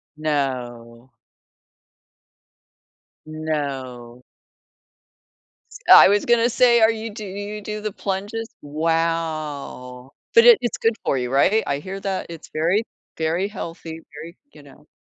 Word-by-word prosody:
No. 125 -5 -4 2.1
No. 135 -6 -5 1.5
S - - -9
I - - +10
was 205 +1 +2
gonna 235 0 +3
say, 240 0 +4
are 220 0 +5
you 225 0 -5
do 210 0 -8
you 205 +2 -6
you 210 - -7
do 210 +1 -6
the 215 -1 -3
plunges? 205 +4 -4
Wow. 155 -5 -3 0.2
But 460 +1 +7
it 475 -2 +9
it's 240 - -2
good 225 0 +1
for 135 - 0
you, 125 0 -3
right? 195 +11 +3
I 140 0 -1
hear 190 +5 -7
that 195 -1 -3
it's 165 -2 -10
very, 170 +8 +1 0.3
very 165 +4 0
healthy. 165 -5 -8
Very, 165 +4 -10 0.2
you 145 - -15
know 145 +2 -18
165 Hz, 130 wpm, -22 LUFS, 140-210 Hz, 2.1 s, I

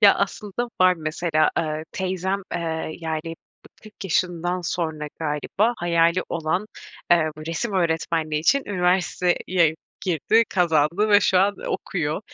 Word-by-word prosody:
Ya, 205 -2 +8
aslında 210 +4 -3
var. 185 0 +6
Mesela, 155 0 0
eee, 155 -1 -1
teyzem, 190 +1 -2
eee, 160 -1 -3
yani, 160 0 -3 0.5
40 215 -2 -12
yaşından 175 0 0
sonra 160 -3 -3
galiba 165 +9 0
hayali 170 0 +2
olan, 170 +5 -1 0.4
eee, 165 -2 +5 0.2
resim 200 +6 -2
öğretmenliği 160 -3 0
için 275 - +3
üniversiteye 180 -3 +1 0.3
girdi, 190 +6 +3
kazandı 170 +3 +2
ve 205 0 +6
şu 190 -2 +3
an 200 +2 +3
okuyor. - - -2
175 Hz, 120 wpm, -23 LUFS, 160-190 Hz, 0.5 s, Ya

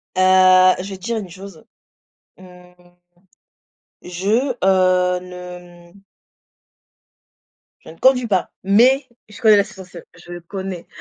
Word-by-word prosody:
Heu, 185 0 +5
je 195 - -8
vais 190 - -8
te 180 - -23
dire 235 -1 -2
une 195 -5 -7
chose: 185 -2 -13 0.7
mmh, 180 -1 -17 1.3
je, 215 +9 -2
heu, 185 -1 +2
ne, 180 -1 -12
mmh 200 - -20 1.8
je - - -16
ne 165 - -17
conduis 255 -2 +2
pas, 190 -4 -1
mais, 250 +8 +3 0.2
je 210 - -14
connais 215 -3 +5
la 200 - +3
sensation, 185 -3 -13
je 175 0 -11
connais. 190 0 -8
185 Hz, 125 wpm, -19 LUFS, 180-200 Hz, 1.8 s, Heu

